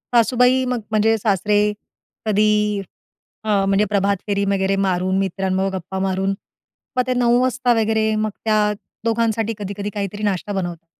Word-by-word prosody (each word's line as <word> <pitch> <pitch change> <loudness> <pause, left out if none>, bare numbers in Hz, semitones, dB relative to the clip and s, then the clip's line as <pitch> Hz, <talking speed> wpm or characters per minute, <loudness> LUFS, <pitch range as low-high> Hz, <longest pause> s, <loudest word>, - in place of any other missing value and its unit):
सासूबाई 250 +2 +4
मग 250 -1 -1
म्हणजे 220 +1 +3
सासरे 205 0 +1 0.7
कधी 210 -1 +2 0.6
अ, 205 -2 +2
म्हणजे 195 +1 +3
प्रभात 200 -1 +1
फेरी 200 -1 0
वगैरे 195 0 +1
मारून 185 -1 +1
मित्रांबरोबर 190 0 -1
गप्पा 190 +1 -5
मारून 195 +1 0 0.6
मग 250 - +4
ते 255 - 0
9:00 245 0 +3
वाजता 255 -1 +1
वगैरे 220 0 +1
मग 215 0 0
त्या 215 -1 +2 0.3
दोघांसाठी 225 -1 0
कधी-कधी 205 0 -4
काहीतरी 205 0 -4
नाश्ता 200 -1 -1
बनवतात. 175 -4 -4
210 Hz, 140 wpm, -20 LUFS, 195-220 Hz, 0.7 s, सासूबाई